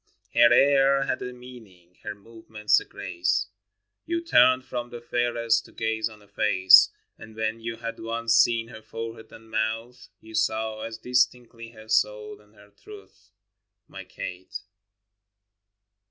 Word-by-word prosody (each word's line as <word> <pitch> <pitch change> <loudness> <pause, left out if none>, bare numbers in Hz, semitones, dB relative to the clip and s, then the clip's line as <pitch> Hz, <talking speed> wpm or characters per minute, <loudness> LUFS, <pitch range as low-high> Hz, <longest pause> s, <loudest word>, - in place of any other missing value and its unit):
Her 120 0 +6
air 135 +1 +4
had 135 - -3
a 125 - -5
meaning, 110 -9 -15
her - - -6
movements 110 0 -1
a - - -11
grace; 90 +3 -2 0.6
You 340 +1 -1
turned 130 - +4
from 120 -2 -5
the 120 - -8
fairest 120 -1 0
to - - -16
gaze 110 0 -2
on 110 -1 -16
her 100 - -21
face: 95 -2 +6 0.3
And 110 0 -13
when 110 +1 -2
you 115 0 -5
had 115 0 -7
once 115 0 -1
seen 115 0 +3
her 110 -2 -11
forehead 115 +1 -8
and 110 0 -15
mouth, 115 +3 -3
You 110 0 -15
saw 110 0 -1
as 115 0 -6
distinctly 120 -1 -1
her 110 -1 -14
soul 105 -1 0
and 105 +1 -26
her 105 0 -19
truth 410 - -16 0.3
— 95 +1 -59
My 95 - -10
Kate. 90 0 -8
115 Hz, 155 wpm, -25 LUFS, 110-120 Hz, 0.6 s, Her